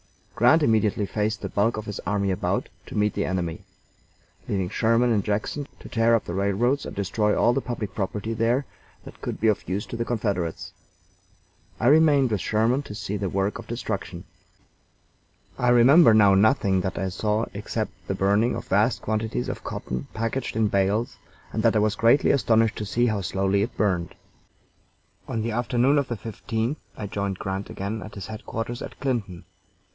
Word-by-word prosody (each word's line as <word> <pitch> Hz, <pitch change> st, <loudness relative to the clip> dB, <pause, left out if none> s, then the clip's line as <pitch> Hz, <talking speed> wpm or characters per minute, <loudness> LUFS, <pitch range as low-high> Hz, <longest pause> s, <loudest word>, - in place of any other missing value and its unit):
Grant 150 Hz, +8 st, +4 dB
immediately 110 Hz, -4 st, +2 dB
faced 105 Hz, +1 st, -2 dB
the -, -, -4 dB
bulk 110 Hz, +3 st, +1 dB
of 110 Hz, -, -5 dB
his 105 Hz, -1 st, -5 dB
army 100 Hz, +1 st, -1 dB
about 95 Hz, -, -1 dB, 0.2 s
to -, -, -6 dB
meet 105 Hz, -1 st, +2 dB
the -, -, -1 dB
enemy, 90 Hz, -3 st, -2 dB, 0.9 s
leaving 95 Hz, -2 st, -1 dB
Sherman 115 Hz, +4 st, +2 dB
in 105 Hz, -, +2 dB
Jackson 110 Hz, +8 st, -2 dB
to -, -, -11 dB
tear 115 Hz, 0 st, +3 dB
up 115 Hz, -, -1 dB
the 85 Hz, -, -5 dB
railroads 100 Hz, +8 st, +1 dB
and -, -, -8 dB
destroy 105 Hz, +2 st, 0 dB
all 120 Hz, -, +4 dB
the 135 Hz, -, 0 dB
public 120 Hz, -6 st, -5 dB
property 105 Hz, +2 st, -3 dB
there 115 Hz, +5 st, +1 dB, 0.4 s
that -, -, -12 dB
could -, -, -4 dB
be 110 Hz, -, +2 dB
of 105 Hz, -5 st, 0 dB
use 95 Hz, +3 st, -2 dB
to -, -, -7 dB
the 115 Hz, -, -1 dB
Confederates. 100 Hz, -8 st, -2 dB, 1.1 s
I -, -, -1 dB
remained 145 Hz, -2 st, +5 dB
with 105 Hz, -4 st, 0 dB
Sherman 115 Hz, +5 st, +1 dB
to 105 Hz, -, -8 dB
see 105 Hz, 0 st, -4 dB
the 100 Hz, -1 st, -2 dB
work 95 Hz, +4 st, -1 dB
of 115 Hz, -, -10 dB
destruction. 100 Hz, -6 st, -4 dB, 1.4 s
I 125 Hz, -, +2 dB
remember 120 Hz, +1 st, +7 dB
now 100 Hz, -2 st, +6 dB
nothing 100 Hz, -2 st, +3 dB
that 95 Hz, 0 st, -3 dB
I 95 Hz, -, -1 dB
saw 105 Hz, +4 st, 0 dB
except 105 Hz, +2 st, -3 dB, 0.2 s
the 95 Hz, -, -1 dB
burning 100 Hz, +5 st, +2 dB
of 115 Hz, -, -6 dB
vast 105 Hz, +5 st, +2 dB
quantities 110 Hz, +2 st, -2 dB
of -, -, -5 dB
cotton 65 Hz, +2 st, -5 dB
packed 115 Hz, +3 st, -2 dB
in 110 Hz, -1 st, +2 dB
bales, 100 Hz, +4 st, 0 dB, 0.4 s
and -, -, 0 dB
that -, -, +3 dB
I -, -, +4 dB
was 105 Hz, 0 st, +2 dB
greatly 115 Hz, +6 st, +4 dB
astonished 115 Hz, -4 st, +2 dB
to 105 Hz, -, -3 dB
see 120 Hz, +4 st, +1 dB
how 110 Hz, -4 st, 0 dB
slowly 95 Hz, +1 st, 0 dB
it 110 Hz, -, -3 dB
burned. 90 Hz, -4 st, 0 dB, 1.1 s
On 110 Hz, -1 st, -2 dB
the 115 Hz, -, -2 dB
afternoon 120 Hz, +5 st, +2 dB
of 140 Hz, -, -1 dB
the 120 Hz, -, -3 dB
15th 115 Hz, +5 st, -3 dB, 0.2 s
I 105 Hz, -, -5 dB
joined 100 Hz, -1 st, -3 dB
Grant 95 Hz, +1 st, -4 dB
again 100 Hz, +3 st, -4 dB
at 105 Hz, -, -9 dB
his 100 Hz, -, -6 dB
headquarters 115 Hz, +2 st, -5 dB
at -, -, -8 dB
Clinton. 110 Hz, -10 st, -3 dB
110 Hz, 185 wpm, -25 LUFS, 100-115 Hz, 1.4 s, remember